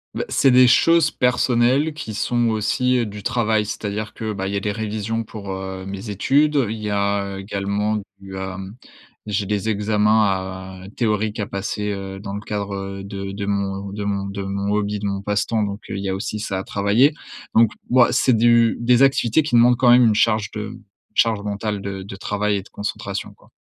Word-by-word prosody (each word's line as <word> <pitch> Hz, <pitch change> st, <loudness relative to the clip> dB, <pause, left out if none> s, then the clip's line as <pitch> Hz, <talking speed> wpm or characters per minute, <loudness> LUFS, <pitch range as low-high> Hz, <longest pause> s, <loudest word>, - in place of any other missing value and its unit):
Bah, -, -, -2 dB
c'est 135 Hz, -, +4 dB
des 125 Hz, 0 st, +7 dB
choses 165 Hz, +4 st, +5 dB
personnelles, 125 Hz, +4 st, +2 dB
qui 110 Hz, -7 st, -6 dB
sont 120 Hz, +2 st, +1 dB
aussi 120 Hz, +3 st, +1 dB
du 105 Hz, 0 st, -8 dB
travail. 110 Hz, -3 st, +1 dB
C'est-à-dire 105 Hz, 0 st, -4 dB
que, 110 Hz, -1 st, -4 dB
bah, 95 Hz, -2 st, -3 dB
il 100 Hz, -, -3 dB
y -, -, 0 dB
a -, -, 0 dB
des 105 Hz, +1 st, -2 dB
révisions 110 Hz, +1 st, -3 dB
pour, 105 Hz, -2 st, -9 dB
heu, 95 Hz, 0 st, -6 dB
mes 100 Hz, +2 st, -6 dB
études, 140 Hz, +5 st, +2 dB
il 110 Hz, -, -3 dB
y 105 Hz, -1 st, -4 dB
a 100 Hz, -1 st, -1 dB
également 100 Hz, +2 st, -1 dB, 0.2 s
du, 95 Hz, -1 st, -9 dB
hem, 95 Hz, +1 st, -6 dB, 0.5 s
j'ai 105 Hz, -1 st, -2 dB
des 105 Hz, +1 st, -1 dB
examens 105 Hz, +1 st, +2 dB
à 95 Hz, -1 st, -3 dB
théoriques 110 Hz, -1 st, 0 dB
à 105 Hz, -, -2 dB
passer, 105 Hz, 0 st, -3 dB
heu, 95 Hz, 0 st, -6 dB
dans 100 Hz, 0 st, -6 dB
le 105 Hz, -, -5 dB
cadre, 100 Hz, -2 st, -4 dB
heu, 95 Hz, 0 st, -6 dB
de 100 Hz, 0 st, -6 dB
de 100 Hz, 0 st, -4 dB
mon, 100 Hz, -1 st, -2 dB
heu, 95 Hz, -, -9 dB
de 105 Hz, -, -4 dB
mon 100 Hz, -1 st, -2 dB
de 100 Hz, 0 st, -5 dB
mon 100 Hz, +1 st, -2 dB
hobby, 105 Hz, 0 st, -1 dB
de 100 Hz, -, -3 dB
mon 100 Hz, 0 st, -3 dB
passe-temps, 105 Hz, +2 st, 0 dB
donc, 100 Hz, 0 st, -3 dB
heu, -, -, -3 dB
il 100 Hz, -, -4 dB
y 95 Hz, -, -2 dB
a -, -, 0 dB
aussi 105 Hz, +2 st, -4 dB
ça 100 Hz, -3 st, -3 dB
à -, -, -4 dB
travailler. 105 Hz, +11 st, +3 dB, 0.4 s
Donc, 115 Hz, -1 st, +5 dB, 0.2 s
bah, 125 Hz, -1 st, +5 dB
c'est 130 Hz, -2 st, +3 dB
du 115 Hz, 0 st, +4 dB
des 125 Hz, +2 st, +4 dB
activités 135 Hz, 0 st, +4 dB
qui 150 Hz, -5 st, -1 dB
demandent 120 Hz, +1 st, +6 dB
quand 125 Hz, -1 st, +4 dB
même 120 Hz, 0 st, +7 dB
une 110 Hz, -, +4 dB
charge 110 Hz, -2 st, +2 dB
de 105 Hz, -1 st, -6 dB, 0.4 s
charge 115 Hz, -4 st, +2 dB
mentale, 105 Hz, 0 st, -3 dB
de 100 Hz, -1 st, -5 dB
de 95 Hz, 0 st, -8 dB
travail 105 Hz, +1 st, -1 dB
et -, -, -3 dB
de 95 Hz, -, -17 dB
concentration 100 Hz, -1 st, -5 dB
quoi. -, -, -24 dB
105 Hz, 210 wpm, -21 LUFS, 100-115 Hz, 0.5 s, des